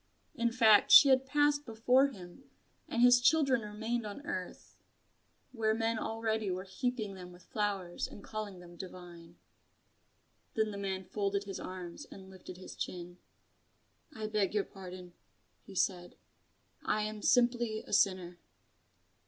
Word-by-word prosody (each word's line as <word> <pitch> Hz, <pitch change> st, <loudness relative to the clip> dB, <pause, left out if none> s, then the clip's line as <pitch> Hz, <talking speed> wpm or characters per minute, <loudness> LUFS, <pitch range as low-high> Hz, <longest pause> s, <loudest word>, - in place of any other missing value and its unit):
In 235 Hz, 0 st, 0 dB
fact, 220 Hz, -4 st, +5 dB
she 280 Hz, -, +10 dB
had 265 Hz, 0 st, +4 dB
passed 290 Hz, +1 st, +2 dB
before 250 Hz, +3 st, +3 dB
him, 200 Hz, +1 st, -12 dB, 0.4 s
and 235 Hz, -, +1 dB
his 245 Hz, 0 st, +7 dB
children 270 Hz, -2 st, +3 dB
remained 220 Hz, +3 st, -3 dB
on 210 Hz, +7 st, -8 dB
earth, 185 Hz, -8 st, -6 dB, 0.8 s
where 220 Hz, -3 st, 0 dB
men 225 Hz, 0 st, 0 dB
already 220 Hz, -2 st, -2 dB
were 185 Hz, 0 st, -3 dB
heaping 215 Hz, +1 st, -3 dB
them 180 Hz, -1 st, -10 dB
with 180 Hz, 0 st, -16 dB
flowers 200 Hz, -4 st, -2 dB
and 200 Hz, -, -12 dB
calling 215 Hz, -3 st, -6 dB
them 175 Hz, 0 st, -13 dB
divine. 175 Hz, -2 st, -10 dB, 1.2 s
Then 220 Hz, -1 st, +1 dB
the 200 Hz, -, -6 dB
man 190 Hz, -1 st, -3 dB
folded 200 Hz, 0 st, -1 dB
his 195 Hz, -1 st, -6 dB
arms 180 Hz, -2 st, -7 dB
and 190 Hz, -1 st, -13 dB
lifted 185 Hz, -1 st, -11 dB
his 185 Hz, -, -10 dB
chin. 175 Hz, 0 st, -6 dB, 0.9 s
"I 220 Hz, -7 st, -6 dB
beg 210 Hz, -1 st, 0 dB
your 205 Hz, -, +2 dB
pardon," 180 Hz, -2 st, -10 dB, 0.5 s
he 195 Hz, -, -11 dB
said, 180 Hz, -1 st, -1 dB, 0.7 s
"I 215 Hz, 0 st, 0 dB
am 215 Hz, 0 st, -5 dB
simply 240 Hz, -2 st, +2 dB
a -, -, -8 dB
sinner." 185 Hz, -3 st, +1 dB
210 Hz, 145 wpm, -32 LUFS, 185-230 Hz, 1.2 s, she